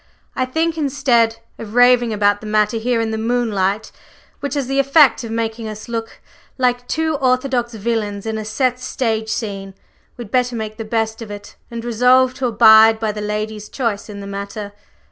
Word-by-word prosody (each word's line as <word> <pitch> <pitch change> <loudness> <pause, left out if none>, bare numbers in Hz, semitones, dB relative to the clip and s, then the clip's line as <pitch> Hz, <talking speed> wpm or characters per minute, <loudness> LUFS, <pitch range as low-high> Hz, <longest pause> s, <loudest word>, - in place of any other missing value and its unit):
I 255 - 0
think 320 +5 -1
instead 255 -6 +2 0.2
of 220 0 -8
raving 245 -1 +5
about 205 -1 +1
the 215 - -8
matter 215 +1 +1
here 235 +1 0
in 225 -1 -2
the 220 - -3
moonlight, 220 -3 -1 0.5
which 285 0 -4
has 280 -2 -1
the 270 +2 -1
effect 275 -3 +4
of 230 - -6
making 225 0 -3
us 215 0 -8
look 225 -1 -5 0.4
like 245 -1 0
two 315 +1 -1
orthodox 255 -2 0
villains 210 -2 -2
in 220 0 -3
a - - -4
set 250 +3 -1
stage 225 -3 -2
scene, 195 -4 -4 0.4
we'd 235 -4 -9
better 250 -1 +1
make 215 -1 -5
the 225 - -5
best 225 0 -2
of 225 - -7
it, 205 0 -9
and 235 0 -6
resolve 250 +2 +3
to 260 - +1
abide 220 -1 +6
by 220 -1 -1
the 210 0 -6
lady's 210 0 -4
choice 230 -6 -3
in 200 -1 -8
the - - -8
matter. 200 +1 -6
225 Hz, 185 wpm, -19 LUFS, 215-250 Hz, 0.5 s, abide